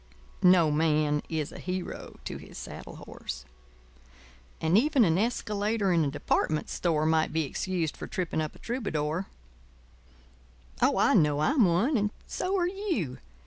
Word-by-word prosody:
No 180 -4 +6
man 150 -1 +2
is 155 -3 -2
a - - -9
hero 185 0 -5
to - - -4
his - - -12
saddle - - -8
horse. 60 0 -7 1.1
And 160 +3 +2
even 265 +1 +5
an 165 0 +2
escalator 210 -3 0
in 165 -2 +3
a 145 - +1
department 150 +2 0
store 155 -3 +1
might 160 0 +2
be 160 0 +1
excused 170 +1 -2
for - - -7
tripping 180 -6 -2
up 155 - -4
a - - -13
troubadour. 190 - -2 1.5
Oh, - - +4
I - - +4
know 150 -2 +4
I'm 250 - +4
one; 200 - +2
and 210 -1 +1 0.2
so 385 +2 -1
are 350 -2 +2
you. 350 - -2
175 Hz, 150 wpm, -28 LUFS, 155-215 Hz, 1.5 s, No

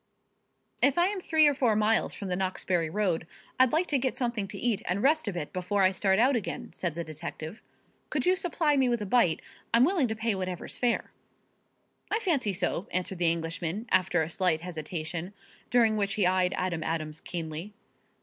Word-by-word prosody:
"If 275 +2 +4
I 350 +2 +4
am 400 -2 -4
three 315 -3 +4
or 290 - +4
four 250 -5 +2
miles 215 +1 +2
from 200 - -6
the 180 - 0
Knoxbury 185 -3 0
road 180 -4 -1 0.3
I'd 260 -1 +5
like 325 +4 +2
to 285 - +2
get 260 0 -1
something 235 -5 -1
to - - -7
eat 235 -5 +1
and 190 +3 -1
rest 310 -1 +3
a 205 - -1
bit 175 -4 -5
before 190 +2 0
I 185 - +5
start 190 0 +2
out 255 +5 +4
again," 225 - -4
said 170 -4 -2
the 170 - -3
detective. 160 +4 -7 0.5
"Could - - -1
you 365 +1 +4
supply 340 -5 +1
me 260 -2 +3
with 235 -3 0
a - - -4
bite? 195 -6 +2 0.3
I'm 235 +1 +5
willing 335 -6 +2
to 220 - -3
pay 220 0 0
whatever's 185 -2 -4
fair." 245 -1 0 1.0
"I 430 - +2
fancy 310 - +1
so," 180 0 -2
answered 185 0 -2
the 170 -2 +3
Englishman, 170 +5 -3
after 180 -3 +3
a 155 - -5
slight 175 -4 +2
hesitation, 165 +1 -5 0.4
during 225 -3 +3
which 200 -1 0
he 205 - +2
eyed 180 0 +2
Adam 180 -3 -1
Adams 155 -1 -3
keenly. 165 +4 -5
195 Hz, 200 wpm, -28 LUFS, 175-245 Hz, 1.0 s, I'd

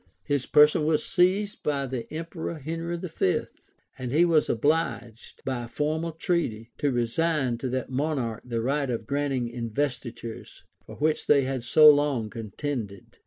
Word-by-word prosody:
His 145 -3 -1
person 150 +1 +5
was 155 -1 +1
seized 195 +3 +1
by 140 -2 -1
the 130 -3 -5
emperor 165 +1 -5
Henry 165 +3 -4
V., 165 - 0 0.6
and 125 -1 -4
he 160 +5 +4
was 160 -3 +3
obliged, 120 -4 -1
by 130 -2 -2
a - - -10
formal 155 +6 -2
treaty, 155 - -2
to 145 - +1
resign 125 +1 0
to 130 - -3
that 130 +1 -3
monarch 130 -5 -1
the 115 -2 -3
right 140 +2 0
of 115 -2 -3
granting 140 -2 -1
investitures, 120 -1 -5 0.2
for - - -9
which 155 +1 0
they 140 -2 +5
had 130 -1 -2
so 150 +6 +6
long 145 -7 +4
contended. 110 -2 -6
140 Hz, 155 wpm, -26 LUFS, 120-155 Hz, 0.6 s, so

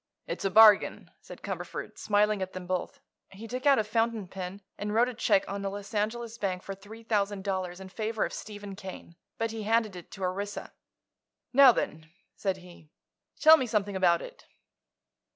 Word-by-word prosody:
"It's - - -5
a - - +3
bargain," 215 +1 +6
said - - -13
Cumberford, - - -5
smiling 210 -1 +2
at 190 0 -4
them 185 -1 -6
both. 185 0 -3 0.3
He 215 +4 -9
took 255 +4 -3
out 275 - +6
a 220 - +2
fountain 225 -1 0
pen 190 +2 -7
and 210 +1 -4
wrote 240 +2 +4
a - - -6
check 210 -4 +2
on 200 0 -4
a 195 - -1
Los 200 +2 -8
Angeles 225 +2 -2
bank 185 -2 -2
for 195 - -5
three 205 +4 -12
thousand 205 -3 0
dollars 185 -2 -3
in 190 - -9
favor 220 +3 -2
of - - -6
Stephen 205 -2 -7
Kane. 190 -3 -9 0.2
But 225 0 -1
he 225 0 -5
handed 220 -1 +1
it 175 - -10
to 195 - -7
Orissa. 200 +3 -4 0.8
"Now 275 0 +9
then," 155 -8 -3 0.3
said 190 -2 -1
he, 175 -4 -15 0.5
"tell 320 +1 +9
me 260 - -1
something 205 -3 -1
about 175 -3 +3
it." - - -12
205 Hz, 190 wpm, -29 LUFS, 190-225 Hz, 0.8 s, Now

